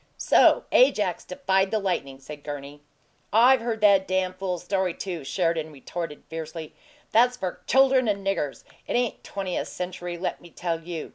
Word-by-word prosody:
"So - - +5
Ajax - - +3
defied 190 -7 0
the 220 - 0
lightning," 160 -10 -2
said 145 +2 -10
Gurney. 145 0 -7 0.5
"I've 245 +4 +6
heard 230 -2 -3
that 200 -2 +5
dam' 185 0 0
fool 185 -1 -3
story, 185 0 -1
too," 175 -6 -5
Sheridan 165 +1 -1
retorted, 150 +2 -6
fiercely. 160 0 -7 0.4
"That's 245 +2 +4
for 185 -6 -4
chuldern 265 -1 +4
and 200 -2 -1
niggers. 150 -8 -2 0.2
It - - -2
ain't 245 -2 -1
twentieth 190 -3 -3
century, 180 -1 -5
let 180 - -3
me 175 - -14
tell 165 0 -3
you! 165 -1 -6
185 Hz, 160 wpm, -25 LUFS, 160-200 Hz, 0.5 s, I've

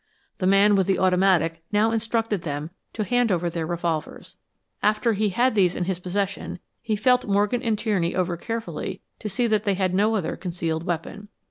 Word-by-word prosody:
The 185 - +1
man 200 +2 +5
with 190 -2 +2
the 195 - +2
automatic 180 -3 +2
now 215 +2 +3
instructed 225 -3 -1
them 150 +1 -4 0.2
to 215 - -2
hand 245 +1 +1
over 175 -1 0
their 165 -2 -3
revolvers. 165 -2 -3 0.5
After 215 +2 +2
he 210 0 +1
had 245 +7 +2
these 185 -4 +3
in - - -1
his 180 0 -2
possession, 195 +2 -3 0.2
he 220 -2 -1
felt 250 +4 +2
Morgan 205 +4 +1
and 225 -4 0
Tierney 200 -6 0
over 180 -1 0
carefully 225 +5 -5 0.2
to 215 - -4
see 225 +5 0
that 215 -2 +1
they 200 -2 +1
had 185 -1 0
no 210 +4 +2
other 190 -7 -1
concealed 170 -3 -3
weapon. 185 +4 -4
195 Hz, 190 wpm, -24 LUFS, 175-215 Hz, 0.5 s, man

